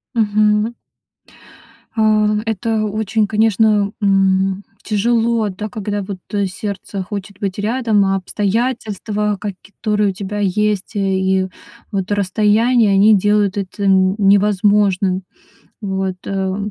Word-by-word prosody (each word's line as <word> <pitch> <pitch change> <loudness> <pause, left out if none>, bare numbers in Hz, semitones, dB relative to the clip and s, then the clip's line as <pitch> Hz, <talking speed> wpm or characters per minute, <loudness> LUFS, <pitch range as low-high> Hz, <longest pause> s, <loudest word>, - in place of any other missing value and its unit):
Мгм. 215 +1 +2 1.2
А, 215 -1 +3 0.2
это 225 0 -1
очень, 215 0 -1
конечно, 215 -1 +2
м, 195 0 +2 0.2
тяжело, 225 +1 +1
да, 210 +3 -5
когда 205 -1 -3
вот, 190 -1 -6
э, 200 -1 +1
сердце 200 -1 -5
хочет 200 0 -7
быть 195 0 -3
рядом, 220 -2 +1
а 195 0 +1
обстоятельства, 210 0 -2
каки 200 -3 -5 0.2
которые 210 -2 +1
у - - -3
тебя 205 +2 -5
есть 205 +1 0
и 190 -1 +1 0.4
вот 195 0 -3
расстояние, 210 +3 +2
они 205 +2 +5
делают 205 0 +1
это 200 +1 -4
н 190 0 +3
невозможным. 200 -2 +2 0.6
Вот, 190 -2 -2
а, 190 -1 -2
205 Hz, 115 wpm, -18 LUFS, 195-215 Hz, 1.2 s, они